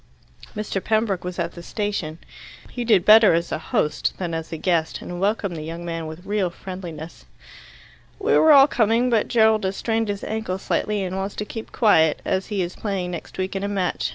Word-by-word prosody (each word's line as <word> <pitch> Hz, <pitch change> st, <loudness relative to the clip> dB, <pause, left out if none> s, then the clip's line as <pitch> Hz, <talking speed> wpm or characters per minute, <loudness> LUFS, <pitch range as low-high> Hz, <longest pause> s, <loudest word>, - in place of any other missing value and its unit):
Mr. 205 Hz, -2 st, -3 dB
Pembroke 215 Hz, -4 st, 0 dB
was 180 Hz, 0 st, -5 dB
at 170 Hz, -1 st, -2 dB
the 170 Hz, -, -10 dB
station. 190 Hz, -5 st, -3 dB, 0.5 s
He 245 Hz, -, -4 dB
did 210 Hz, -6 st, +3 dB
better 215 Hz, -4 st, +7 dB
as 170 Hz, +1 st, -2 dB
a -, -, -2 dB
host 150 Hz, -1 st, -1 dB
than 175 Hz, -3 st, -4 dB
as 160 Hz, 0 st, -4 dB
a 165 Hz, -, -4 dB
guest, 165 Hz, -1 st, 0 dB
and 175 Hz, 0 st, -7 dB
welcomed 200 Hz, -2 st, 0 dB
the 155 Hz, -, -5 dB
young 165 Hz, +2 st, -6 dB
man 165 Hz, -1 st, -4 dB
with 160 Hz, +4 st, -9 dB
real 205 Hz, -3 st, 0 dB
friendliness. 170 Hz, -3 st, -9 dB, 0.9 s
"We 440 Hz, +2 st, +1 dB
were 315 Hz, -, +6 dB
all 275 Hz, -2 st, +9 dB
coming, 235 Hz, 0 st, +2 dB
but 225 Hz, -3 st, +2 dB
Gerald 220 Hz, -2 st, +3 dB
has 190 Hz, +1 st, -1 dB
strained 225 Hz, -1 st, 0 dB
his 200 Hz, -1 st, -4 dB
ankle 220 Hz, -4 st, -3 dB
slightly, 205 Hz, +1 st, -1 dB
and 185 Hz, 0 st, -4 dB
wants 195 Hz, +1 st, -3 dB
to 210 Hz, -, -4 dB
keep 225 Hz, +1 st, -8 dB
quiet, 160 Hz, -9 st, +3 dB
as 190 Hz, -, -1 dB
he 200 Hz, -3 st, -1 dB
is 175 Hz, +1 st, -6 dB
playing 190 Hz, -4 st, -3 dB
next 170 Hz, -, -8 dB
week 190 Hz, +1 st, -3 dB
in 195 Hz, -, -2 dB
a -, -, -1 dB
match. 195 Hz, -3 st, -1 dB
195 Hz, 210 wpm, -23 LUFS, 170-215 Hz, 0.9 s, all